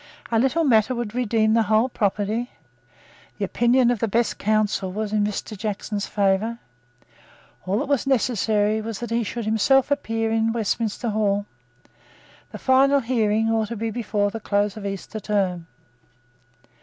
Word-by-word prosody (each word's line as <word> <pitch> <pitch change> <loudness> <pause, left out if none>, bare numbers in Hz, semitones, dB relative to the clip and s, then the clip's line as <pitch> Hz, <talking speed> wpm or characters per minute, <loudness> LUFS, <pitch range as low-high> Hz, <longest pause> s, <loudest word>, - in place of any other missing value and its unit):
A 225 - +3
little 270 +7 +2
matter 250 -2 +3
would 235 -3 -4
redeem 225 -3 +1
the 230 - +4
whole 220 +3 +2
property. 215 +1 -1 0.9
The 205 - -1
opinions 240 +4 +3
of 240 - -1
the 230 - 0
best 230 +3 0
counsel 210 -3 0
were 215 +3 -3
in 210 0 0
Mr. 210 +1 -3
Jackson's 205 0 -4
favour. 205 +3 0 1.1
All 195 +2 +1
that 275 - -2
was 280 -1 0
necessary 220 -4 +1
was 220 -1 -5
that 240 -1 -6
he 235 +1 +1
should 230 +2 -4
himself 255 +6 +3
appear 225 -5 -1
in 225 0 +1
Westminster 225 +1 -1
Hall. 205 -1 0 1.1
The 215 - -7
final 270 +4 +4
hearing 225 -2 +1
ought 220 -1 +1
to 235 - -5
be 225 +1 -2
before 210 -3 -1
the 225 - -5
close 205 -1 0
of 205 -2 -5
Easter 195 +2 -6
Term. 190 -5 -1
220 Hz, 155 wpm, -23 LUFS, 205-235 Hz, 1.1 s, the